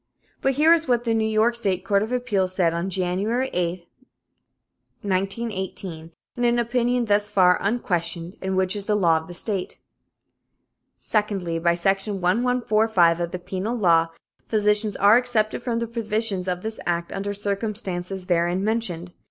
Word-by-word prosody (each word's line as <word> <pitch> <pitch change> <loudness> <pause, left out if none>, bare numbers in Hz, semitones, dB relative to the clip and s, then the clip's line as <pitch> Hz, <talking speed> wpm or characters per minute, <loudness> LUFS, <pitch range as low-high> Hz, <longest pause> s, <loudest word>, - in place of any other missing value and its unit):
But 270 - +2
here 310 +5 +5
is 330 -2 +1
what 240 -2 +2
the 230 -2 0
New 220 -1 +1
York 220 +2 +2
State 195 -5 -2
Court 200 0 +2
of 220 +3 -3
Appeals 205 -7 0
said 170 -3 +2
on 170 +3 -2
January 195 +8 -1
8, 175 0 -2 1.2
1918, 190 -4 -3 0.2
in 245 - -3
an 240 0 +3
opinion 240 +1 +1
thus 205 -1 +1
far 185 -3 +4
unquestioned 175 -5 -2
and 190 0 -2
which 190 +1 +1
is 205 -1 -3
the 210 - +2
law 170 -5 +3
of 160 0 -6
the 175 - -8
state: 195 -1 -2 1.2
"Secondly, 195 -6 -1
by 170 +1 +2
section 195 +4 0
1145 215 -3 +2
of 170 -1 -2
the 180 - -4
Penal 190 +6 -4
Law, 170 -5 +4 0.4
physicians 210 -1 +2
are 205 +3 +6
excepted 220 -3 -1
from 240 -1 -2
the 235 - -1
provisions 220 -4 -2
of 180 -1 -2
this 220 0 -3
act 170 0 -1
under 200 +1 -3
circumstances 200 -3 -3
therein 175 +1 +1
mentioned. 185 -6 -2
200 Hz, 160 wpm, -23 LUFS, 180-225 Hz, 1.2 s, are